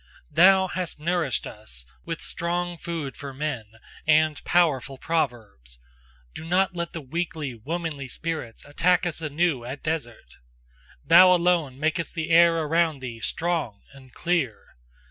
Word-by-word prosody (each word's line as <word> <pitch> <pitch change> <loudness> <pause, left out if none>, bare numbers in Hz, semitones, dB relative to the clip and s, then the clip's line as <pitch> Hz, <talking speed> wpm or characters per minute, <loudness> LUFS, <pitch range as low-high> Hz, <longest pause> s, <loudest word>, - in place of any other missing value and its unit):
Thou 190 +2 +6
hast 180 -4 -4
nourished 165 -4 0
us 60 0 -8 0.2
with - - -5
strong 175 +1 -2
food 165 -6 -4
for 140 -2 -8
men, 145 -6 -3 0.4
and 155 -1 +3
powerful 140 -6 +2
proverbs: 110 - -3 0.6
do - - -8
not 180 +3 +1
let 170 -1 -4
the 165 - -5
weakly, 155 -1 -4
womanly 150 +3 -4
spirits 155 -4 -5
attack 175 +5 +2
us 165 -2 -3
anew 155 -3 0
at 130 +4 -7
dessert! 135 - -4 0.7
Thou 185 0 +8
alone 170 -7 +1
makest 160 +3 -1
the 165 0 -3
air 165 -1 +5
around 160 -1 +1
thee 120 -3 -7
strong 160 -7 -2
and 130 -2 -16
clear! 160 -10 -2
160 Hz, 135 wpm, -25 LUFS, 135-170 Hz, 0.7 s, Thou